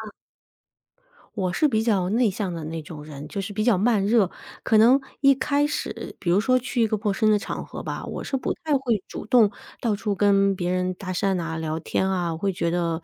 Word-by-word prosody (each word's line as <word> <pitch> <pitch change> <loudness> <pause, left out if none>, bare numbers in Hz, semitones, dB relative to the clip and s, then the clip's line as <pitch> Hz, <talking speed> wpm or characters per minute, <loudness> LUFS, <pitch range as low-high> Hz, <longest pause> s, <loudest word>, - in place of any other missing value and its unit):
嗯。 - - -8 1.3
我 185 -3 -1
是 305 - +2
比 220 -6 +1
较 200 -6 +1
内 230 0 +3
向 190 -2 -3
的 165 - -5
那 165 +1 -4
种 150 -1 -9
人， 150 -1 -9
就 195 +6 -4
是 200 +2 -5
比 215 +2 -1
较 240 -5 +4
慢 205 0 +2
热。 215 -4 +3 0.3
可 220 - +3
能 245 +5 +6 0.2
一 275 -1 +6
开 285 +2 +1
始， 295 - -5
比 175 - -1
如 180 - +4
说 255 +5 +3
去 250 -1 -2
一 225 - +4
个 215 - 0
陌 205 0 0
生 215 +2 +1
的 210 - +5
场 - - -5
合 - - -7
吧， - - -5
我 - - -5
是 270 - -2
不 - - -2
太 315 - -2
会 235 -7 -1
主 - - -7
动 220 -2 +5 0.3
到 220 -4 0
处 210 -1 -2
跟 200 -1 +3
别 180 -2 -2
人 185 0 0
搭 185 0 -6
讪 195 +2 0
呐、 165 -2 -3
聊 160 0 -3
天 190 +3 -1
啊。 180 -3 0
我 160 - -5
会 195 +2 0
觉 170 -2 -1
得， 170 -1 -1
200 Hz, 260 characters per minute, -24 LUFS, 175-225 Hz, 1.3 s, 能